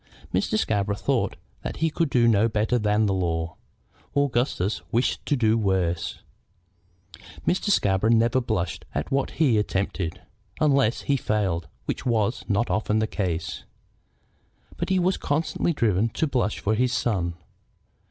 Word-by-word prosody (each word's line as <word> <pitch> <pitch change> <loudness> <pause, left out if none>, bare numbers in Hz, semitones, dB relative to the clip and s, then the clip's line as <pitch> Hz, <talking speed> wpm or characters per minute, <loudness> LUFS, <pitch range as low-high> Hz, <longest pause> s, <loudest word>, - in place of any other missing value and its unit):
Mr. 215 - +1
Scarborough 100 - 0
thought - - 0 0.3
that - - -5
he 160 0 +1
could 165 -1 0
do 115 -3 +4
better 110 +3 +1
than 105 0 +2
the 100 - +1
law. 80 -3 -1 0.6
Augustus 120 -7 +1
wished 120 +3 +1
to 145 - +3
do 115 -3 +2
worse. 90 -5 -1 1.2
Mr. 185 +3 +1
Scarborough 100 - +3
never 115 +2 +3
blushed 90 -8 -2
at 75 - -2
what 135 0 +1
he 155 -4 +4
himself 110 - +4
attempted, 95 -3 -3 0.4
unless 140 -6 +3
he 140 - +1
failed, 95 -8 -1 0.2
which - - -3
was 115 -1 0
not 105 +4 +1
often 105 0 +1
the 110 - +2
case. 90 -6 -3 1.1
But - - -3
he 190 - +3
was 185 +1 +2
constantly 155 +3 0
driven 115 - +1
to 160 - +1
blush 125 -7 0
for 110 - 0
his 125 +3 +1
son. 95 -9 0
110 Hz, 145 wpm, -25 LUFS, 95-130 Hz, 1.2 s, do